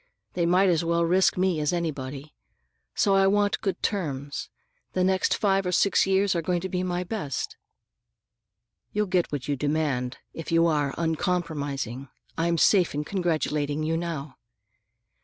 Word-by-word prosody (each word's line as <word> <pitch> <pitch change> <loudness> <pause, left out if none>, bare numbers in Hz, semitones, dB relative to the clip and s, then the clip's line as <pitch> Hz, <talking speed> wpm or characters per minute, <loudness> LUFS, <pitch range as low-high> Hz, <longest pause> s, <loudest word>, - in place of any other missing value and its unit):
They 170 -1 +1
might 185 +3 +4
as 170 -2 +2
well 170 0 +1
risk 185 +3 +3
me 180 -3 +1
as 150 -1 +1
anybody. 145 -4 -4 0.6
So 200 - +3
I 195 0 +5
want 205 +1 +2
good 195 -3 -2
terms. 145 -8 -3 0.4
The 185 - +1
next 190 +1 +2
five 195 -2 +2
or 180 - -2
six 195 +2 +3
years 195 0 +3
are 170 - 0
going 175 +1 0
to 190 - -4
be 180 0 -1
my 180 -1 -1
best." 175 - -4 1.4
"You'll 210 0 +1
get 180 -2 0
what 145 -4 -4
you 145 - 0
demand, 140 -3 -1 0.2
if 165 - -7
you 165 0 +4
are 145 -4 +1
uncompromising. 150 - -2 0.3
I'm 170 +1 +1
safe 180 -1 +4
in 150 - -1
congratulating 155 -4 -1
you 160 +1 0
now." 165 -4 -4
170 Hz, 160 wpm, -26 LUFS, 150-185 Hz, 1.4 s, I